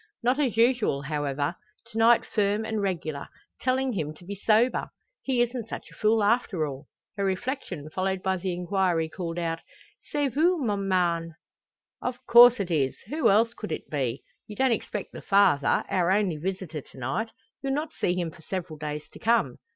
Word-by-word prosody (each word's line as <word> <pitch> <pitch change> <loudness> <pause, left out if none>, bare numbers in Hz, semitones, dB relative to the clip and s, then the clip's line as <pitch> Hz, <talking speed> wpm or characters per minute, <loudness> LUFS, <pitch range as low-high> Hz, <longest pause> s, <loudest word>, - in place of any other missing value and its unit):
Not 250 +4 +2
as 255 -7 0
usual 230 - +3
however; 145 0 -1 0.4
to 220 - -7
night 230 +1 +5
firm 210 +1 0
and 220 -1 -2
regular, 165 -7 -3 0.3
telling 260 0 +1
him 155 -5 -3
to 175 - -16
be 200 - -5
sober! 220 +5 +2 0.3
"He 250 -3 +2
isn't 240 -2 -4
such - - -7
a - - -15
fool 215 0 +2
after 205 -6 +2
all!" 140 0 -7 0.3
Her 200 - -1
reflection 190 - -3
followed 190 +1 -1
by 190 0 +1
the 185 +1 -2
inquiry, 175 -2 0
called 170 0 -5
out 165 -1 -2 0.5
"C'est 290 -2 +1
vous, 345 +5 +3
mon 205 -8 -1
mari?" 170 -3 +1 0.7
"Of 250 0 -2
course 240 +1 +8
it 185 -3 -2
is. 140 -5 +1
Who 300 -4 +2
else 225 +4 +4
could 215 - -7
it - - -5
be? 135 -3 -2 0.2
You 210 - -8
don't 260 +3 +2
expect 210 -3 -3
the - - -9
Father, 195 -8 +3
our 180 -2 +1
only 190 -4 +2
visitor, 175 -2 -4
to - - -18
night? 135 - -2 0.3
You'll 270 -1 -1
not 305 +2 -2
see 175 - 0
him 175 -3 -2
for 170 - -16
several 165 -3 -5
days 150 0 -5
to - - -14
come." 220 - +1
195 Hz, 185 wpm, -27 LUFS, 165-230 Hz, 0.7 s, course